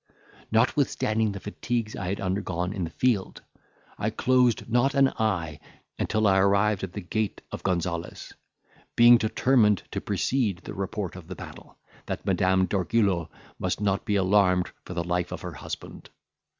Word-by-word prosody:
Notwithstanding 110 -2 +1
the 100 - -6
fatigues 110 +3 -3
I 95 - -4
had 100 +2 -2
undergone 95 -1 -2
in 95 -4 -2
the - - -6
field, 105 +1 -1 0.6
I - - 0
closed 125 -2 +2
not 120 +4 +2
an 135 -1 +5
eye 90 -9 -1 0.4
until 110 0 0
I 95 -1 +4
arrived 100 +1 +2
at 95 -2 -5
the 105 - -5
gate 105 +3 -3
of - - -6
Gonzales, 85 -2 -3 0.6
being 120 +1 +8
determined 110 -2 +3
to - - -3
precede 115 -9 0
the - - -7
report 95 -1 -4
of 90 -3 -10
the - - -7
battle, - - -11 0.3
that - - -4
Madame 95 0 +2
d'Orgullo 95 -3 +1 0.3
might 90 +1 -1
not 100 -2 0
be 105 - 0
alarmed 95 -2 +3
for 90 - -7
the 85 - -1
life 90 0 -1
of - - -5
her - - -6
husband. - - -8
100 Hz, 160 wpm, -26 LUFS, 90-110 Hz, 0.6 s, being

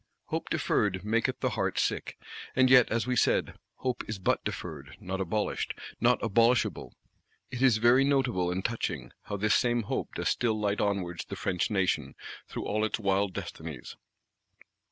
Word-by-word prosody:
Hope - - -3
deferred 95 -3 0
maketh 115 +2 0
the - - +1
heart - - -1
sick. - - -1 0.4
And 130 0 +4
yet, 125 -2 +7
as 115 +1 0
we 125 0 0
said, - - +2 0.2
Hope 125 -2 -2
is 110 - -3
but 95 - 0
deferred; - - -6
not 95 +1 -4
abolished, 105 +3 -2 0.2
not 120 +1 +4
abolishable. 115 +3 +2 0.6
It 125 - -5
is 130 -5 +5
very 120 +4 +5
notable, 130 -10 +1
and 95 +2 -3
touching, 115 -1 -2
how 105 - -4
this 105 +1 +2
same 120 -1 +2
Hope - - -3
does - - -2
still 110 -3 0
light 105 -1 0
onwards 95 -4 -1
the - - -6
French 95 +3 -1
Nation 95 -4 0 0.3
through - - -5
all 110 +1 0
its 110 - 0
wild 100 -2 0
destinies. 80 -7 -7
110 Hz, 165 wpm, -29 LUFS, 95-120 Hz, 0.6 s, yet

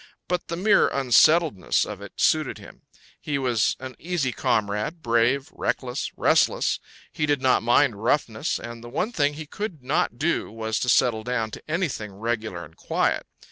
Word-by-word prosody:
But 180 0 -2
the 170 - -3
mere 200 +4 +4
unsettledness 140 - +3
of - - -7
it - - -10
suited - - +2
him: - - -14 0.4
he 145 -2 -2
was 125 -5 +1
an 130 -1 -8
easy 165 -7 -1
comrade, 110 +9 -1
brave, 120 +5 +1
reckless, 125 0 -2
restless; - - +2 0.3
he 150 - -1
did 145 -2 +2
not 130 -1 +3
mind 120 -2 +3
roughness, 140 +3 0
and 120 0 -8
the 120 - -9
one 200 - -1
thing 145 -8 +1
he 155 +1 -7
could 165 - -6
not - - 0
do - - -1
was 110 0 -2
to 125 - -1
settle 115 -2 +3
down 115 -2 -2
to - - -8
anything 155 - -2
regular 110 -4 -3
and 80 - -18
quiet. - - 0
125 Hz, 170 wpm, -24 LUFS, 115-150 Hz, 0.4 s, mere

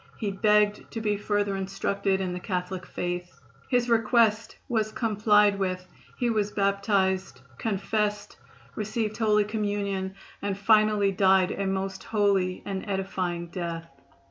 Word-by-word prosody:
He 210 -3 -2
begged 210 +1 +2
to 225 - -3
be 210 -2 0
further 205 -1 0
instructed 195 0 -1
in 185 -1 -2
the 180 - -4
Catholic 180 0 -4
faith. 175 0 -4 0.3
His 245 -2 +2
request 225 -1 +2
was 220 -4 0
complied 210 -2 +3
with, 185 -1 -2 0.3
he 245 - 0
was 210 -2 +1
baptized, 195 - 0 0.2
confessed, 210 0 -1 0.4
received 215 0 -2
Holy 210 -2 +3
Communion 205 -2 -2 0.3
and 200 -1 -2
finally 210 -1 +4
died 190 -1 +4
a 195 - -2
most 190 0 -3
holy 195 -4 +1
and 195 -1 -3
edifying 185 -3 -2
death. 170 -2 -4
200 Hz, 130 wpm, -27 LUFS, 190-210 Hz, 0.4 s, finally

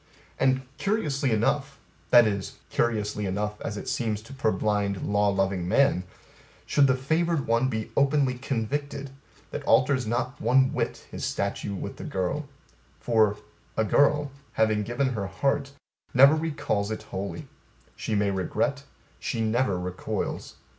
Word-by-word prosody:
And, 130 0 +3 0.2
Curiously 150 -7 0
enough, 135 +6 +1 0.3
that 120 -2 +8
is, 100 -2 -2 0.2
curiously 105 -3 0
enough 105 +2 -3
as 105 - -4
it - - -7
seems 110 -3 -1
to 130 - -11
purblind 105 -5 0
law 105 0 +2
loving 95 -2 0
man, 110 -3 +3 0.6
should 140 -2 +4
the 130 - +3
favored 160 +3 0
one 115 +3 +2
be 110 -3 -3
openly 140 -2 +3
convicted, 140 +2 -3 0.4
that - - -4
alters 130 -2 +3
not 125 +4 -2
one 130 +1 +4
whit - - -2
his - - -6
statue 100 - -2
with - - -6
the - - -7
girl; 95 +11 -2 0.5
for, 110 +1 +3 0.4
A 110 - +3
girl, 145 +5 +3 0.2
having 110 -1 +2
given 120 +5 0
her 105 -6 -3
heart, 135 +8 0 0.4
never 135 +4 +8
recalls 150 -10 -1
it 110 - -4
not - - -18
wholly: 100 +10 -5 0.5
she 110 - -2
may 100 -1 +2
regret; 140 +9 -1 0.3
she 115 - -3
never 110 -3 +1
recoils. 90 0 -4
120 Hz, 145 wpm, -27 LUFS, 105-140 Hz, 0.6 s, that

